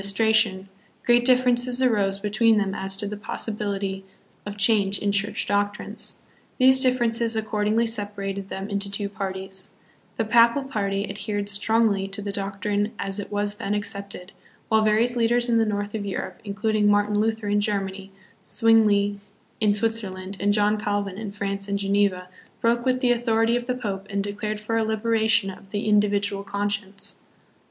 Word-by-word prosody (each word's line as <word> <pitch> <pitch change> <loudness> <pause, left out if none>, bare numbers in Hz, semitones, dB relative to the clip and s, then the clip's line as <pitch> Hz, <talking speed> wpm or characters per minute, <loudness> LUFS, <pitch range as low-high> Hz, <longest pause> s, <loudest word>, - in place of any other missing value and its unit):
istration, 200 -1 +2 0.4
great 240 0 +4
differences 250 0 +3
arose 205 -6 +2
between 215 +2 +2
them 200 -2 0
as 195 0 -1
to 205 - -1
the 210 - -4
possibility 200 -2 -4 0.4
of 205 0 -6
change 200 -1 +3
in 205 - 0
Church 205 +2 0
doctrines. 205 0 -2 0.3
These 260 +1 +6
differ 255 -2 +3
ences 230 0 +1
accordingly 215 +1 0
separated 200 -3 -3
them 195 +1 -5
into 200 -1 -1
two 200 0 -2
parties; 190 -1 -5 0.5
the 225 - -1
Papal 235 +4 +4
party 200 -6 -2
adhered 205 +1 -3
strongly 205 -1 +2
to 195 +1 -6
the 205 0 -4
doctrine 200 +1 -2
as 195 +1 -2
it 205 - -6
was 205 0 -1
then 205 +1 -2
accepted, 200 -2 -5 0.4
while 220 0 +4
various 220 +3 +2
leaders 240 +1 +2
in 230 -1 +3
the 225 - +2
north 205 0 -2
of 215 -2 -3
Europe, 200 -2 -5
including 210 +1 +1
Martin 205 0 +2
Luther 220 0 -1
hi 205 - +1
Germany, 195 -2 -2 0.3
Swingli 210 -3 +3 0.4
in 215 -2 +3
Switzer 225 0 0
land, 185 +1 -8
and 205 +2 +2
John 210 +1 +2
Calvin 205 -2 -2
in 215 -2 -5
France 200 -1 -3
and 200 0 -1
Geneva, 200 -2 +1 0.3
broke 235 +1 +1
with 255 0 +1
the 250 -2 +3
authority 230 -1 +2
of 245 0 -3
the 250 - 0
Pope 200 -5 -5
and 200 0 -1
declared 210 +1 -3
for 225 +2 -2
a 225 - +2
liberation 220 -2 +1
of 195 +1 -14
the 205 +1 -3
individual 205 -1 +2
conscience. 200 0 -4
205 Hz, 165 wpm, -24 LUFS, 200-225 Hz, 0.5 s, These